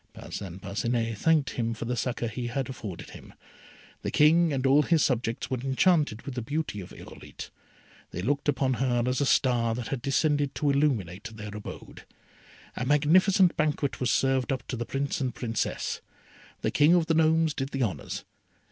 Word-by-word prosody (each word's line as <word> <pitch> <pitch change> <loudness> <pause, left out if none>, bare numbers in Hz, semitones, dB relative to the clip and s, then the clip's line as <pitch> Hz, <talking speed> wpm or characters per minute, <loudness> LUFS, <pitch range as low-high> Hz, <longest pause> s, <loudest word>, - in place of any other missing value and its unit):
Parcin 95 -2 -7
Parcinet 115 +4 -1
thanked 155 +4 +2
him 115 -1 -2
for 110 - -5
the 125 +1 -1
succour 120 0 -2
he 120 +2 -4
had 130 +1 -2
afforded 105 -9 -7
them. - - -13 0.7
The - - -2
King 165 +2 +4
and 135 -2 -1
all 135 +3 +6
his 160 +1 +3
subjects 120 -2 -1
were 130 - 0
enchanted 135 - +2
with 140 - -6
the 125 - -3
beauty 145 -4 -3
of 90 - -11
Irolite. - - -10 0.6
They 90 - -5
looked 140 +5 0
upon 135 -2 +1
her 120 -2 +1
as 125 +2 0
a 140 - +2
star 120 -4 +2
that 120 -2 -5
had 135 -3 -3
descended 145 +1 +1
to 145 -2 +1
illuminate 115 - 0
their 105 -2 -7
abode. 105 - -9 0.7
A - - -3
magnificent 170 +7 +4
banquet 150 -3 0
was 125 - 0
served 135 +1 +1
up 130 -1 -3
to - - -2
the 120 -1 -4
Prince 140 +2 -2
and 125 -3 -2
Princess. 115 -3 -2 0.6
The - - +1
King 150 +4 +5
of 170 -2 +3
the 165 - +1
Gnomes 160 0 +3
did 135 -1 -3
the 135 -2 -1
honours. 95 - -4
130 Hz, 185 wpm, -27 LUFS, 115-145 Hz, 0.7 s, all